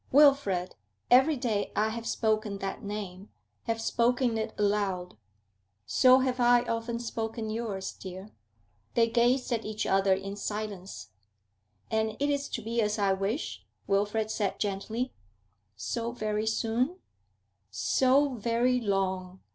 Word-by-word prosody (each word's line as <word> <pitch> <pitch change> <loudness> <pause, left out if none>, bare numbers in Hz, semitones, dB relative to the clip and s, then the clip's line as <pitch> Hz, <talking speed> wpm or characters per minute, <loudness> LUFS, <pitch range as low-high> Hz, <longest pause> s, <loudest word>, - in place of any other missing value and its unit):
Wilfrid! 270 -11 +4 0.4
Every 265 +5 +6
day 225 -5 -1
I 215 +1 +2
have 230 +1 -5
spoken 215 -2 0
that 195 0 -4
name, 200 -2 -6 0.4
have 225 0 -1
spoken 240 +1 +1
it 220 0 -2
aloud.' 200 -3 0 0.7
'So 255 - +6
have 255 -1 0
I 240 0 +5
often 230 0 -2
spoken 225 -1 -4
yours, 215 -4 -3
dear.' 190 +2 -9 0.6
They 230 -1 +4
gazed 245 +3 +2
at 230 -2 0
each 215 0 -3
other 195 0 +3
in 195 +1 -5
silence. 200 - -5 0.8
'And 220 0 0
it 285 +1 +1
is 285 0 -1
to 235 - -4
be 230 +1 0
as 210 0 0
I 200 -2 +2
wish?' 195 +9 -3 0.2
Wilfrid 210 +2 0
said 205 -3 -1
gently. 215 +5 -2 0.6
'So 230 - -3
very 215 -2 -2
soon?' 235 +9 0 0.7
'So 270 +2 +3
very 240 +2 +1
long! 190 -3 -1
220 Hz, 130 wpm, -29 LUFS, 200-240 Hz, 0.8 s, Every